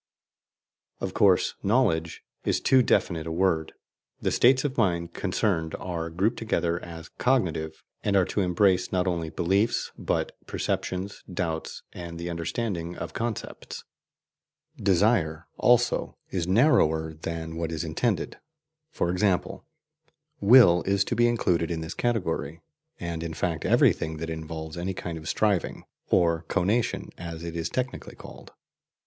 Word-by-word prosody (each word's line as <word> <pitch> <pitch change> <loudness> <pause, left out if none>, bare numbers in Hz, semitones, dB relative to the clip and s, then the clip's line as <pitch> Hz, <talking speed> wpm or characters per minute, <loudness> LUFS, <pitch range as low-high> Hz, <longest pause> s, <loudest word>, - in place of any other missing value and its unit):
Of - - -3
course, - - +4
"knowledge" 90 -8 +1 0.2
is - - +1
too 130 -1 +5
definite 85 -8 +1
a - - -3
word: 80 -2 +1 0.5
the - - 0
states 130 +2 +4
of 135 -2 -1
mind 85 -7 0
concerned 80 -6 -1
are 85 -2 -4
grouped 95 +8 0
together 85 -6 -1
as 80 -2 -9
"cognitive," 85 -11 0 0.2
and 100 - +1
are 95 -2 +5
to 100 - -1
embrace 90 0 +2
not 90 0 +1
only 85 -3 -1
beliefs, 100 +8 +1
but - - -1 0.2
perceptions, 95 +2 -3
doubts, 80 -3 -3
and 85 -1 -7
the 85 +1 -4
understanding 85 0 -3
of 85 0 -6
concepts. 115 -2 -5 0.9
"Desire," 95 - +2
also, 120 0 +3
is 90 -3 -1
narrower 80 - +3
than 80 +1 -5
what 85 0 -3
is 80 0 -3
intended: 90 +7 -1 0.5
for 85 - -1
example, 90 0 0 0.7
WILL 100 -5 +7
is 100 0 +3
to 120 - -2
be 120 +1 +4
included 90 -8 +1
in 85 -1 -2
this 80 +2 -5
category, 85 - -1 0.4
and 85 -1 -4
in 85 -1 -5
fact 80 -1 -2
every - - +5
thing 80 0 -5
that 80 +1 -4
involves 80 0 -6
any 95 +2 -3
kind 85 -2 -5
of 80 - -7
striving, 105 -5 0 0.3
or 85 -2 +3
"conation" 100 +5 0
as 85 -1 -6
it 85 -1 -5
is 85 -1 -2
technically 130 -1 -4
called. - - -12
85 Hz, 140 wpm, -26 LUFS, 80-100 Hz, 0.9 s, WILL